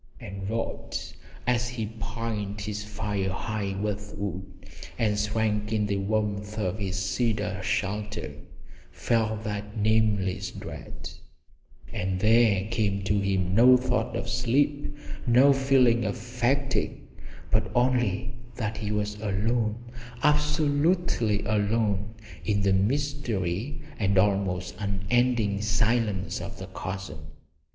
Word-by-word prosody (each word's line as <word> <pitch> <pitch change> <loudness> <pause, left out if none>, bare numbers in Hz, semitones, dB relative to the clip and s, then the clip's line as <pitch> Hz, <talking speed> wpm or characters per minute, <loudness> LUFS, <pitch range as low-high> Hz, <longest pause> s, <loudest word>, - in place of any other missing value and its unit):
And 95 0 -6
Rod, 115 +1 -3 0.5
as 125 0 +1
he 120 -3 -3
piled 110 -3 -3
his 105 0 -3
fire 105 -2 -2
high 100 0 -2
with 105 0 -3
wood 95 -1 -5 0.3
and 105 -2 +2
shrank 105 0 0
in 105 -1 +2
the 100 -1 0
warmth 105 +1 -1
of 105 -1 -1
his 95 -2 -2
cedar 100 +1 0
shelter, 105 -2 -2 0.6
felt 110 -2 0
that 105 0 -4
nameless 105 -3 +2
dread; - - -8 0.8
and 95 0 -1
there 110 -2 +4
came 100 -4 0
to 100 +1 +2
him 95 -2 +1
no 125 +4 +8
thought 125 0 -1
of - - -3
sleep, 145 +4 +1 0.3
no 130 +4 +7
feeling 135 -3 +4
of 100 -2 -1
fatigue, 125 +3 0 0.5
but - - +2
only 125 -2 +2 0.2
that 110 -3 -2
he 105 0 -3
was 105 0 -2
alone, 110 +2 +1 0.5
absolutely 150 - +2
alone, 105 0 +1 0.3
in 100 -2 +1
the 100 -1 +4
mystery 120 - -1 0.2
and 100 -2 +2
almost 95 -1 +2
unending 105 +1 +1
silence 105 -4 +1
of 115 - -7
the 95 - -6
chasm. 95 -4 -6
105 Hz, 115 wpm, -27 LUFS, 100-120 Hz, 0.8 s, no